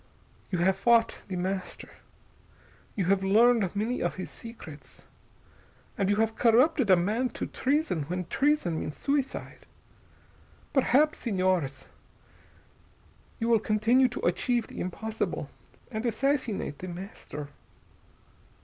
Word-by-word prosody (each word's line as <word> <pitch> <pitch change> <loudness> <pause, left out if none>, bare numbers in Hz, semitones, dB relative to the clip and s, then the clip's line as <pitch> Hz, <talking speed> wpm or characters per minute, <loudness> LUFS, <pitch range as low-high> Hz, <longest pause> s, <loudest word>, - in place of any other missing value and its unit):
You 185 - -1
have 190 +2 +2
fought 230 +2 +3
The 190 - -4
Master, 185 +1 -4 1.1
you 195 - 0
have 195 +1 +2
learned 215 0 +4
many 225 +5 -1
of - - -1
his 185 - -6
secrets, 160 -11 -11 0.9
and 195 -1 0
you 205 - +3
have 220 +1 +1
corrupted 245 +1 +4
a 185 - +8
man 215 +9 0
to - - -2
treason 275 - 0
when 180 +3 -3
treason 270 - +1
means 150 - -5
suicide. 280 -1 -3 1.1
Perhaps, 285 +3 +3
Señores, 185 - 0 1.5
you 230 - -1
will 230 -1 +4
continue 230 +5 +3
to 240 - -5
achieve 235 +7 +1
the - - -10
impossible, 220 +5 -3 0.4
and 220 -1 -3
assassinate 240 - -1
The 185 - -6
Master." 175 -5 -8
215 Hz, 120 wpm, -28 LUFS, 185-245 Hz, 1.5 s, a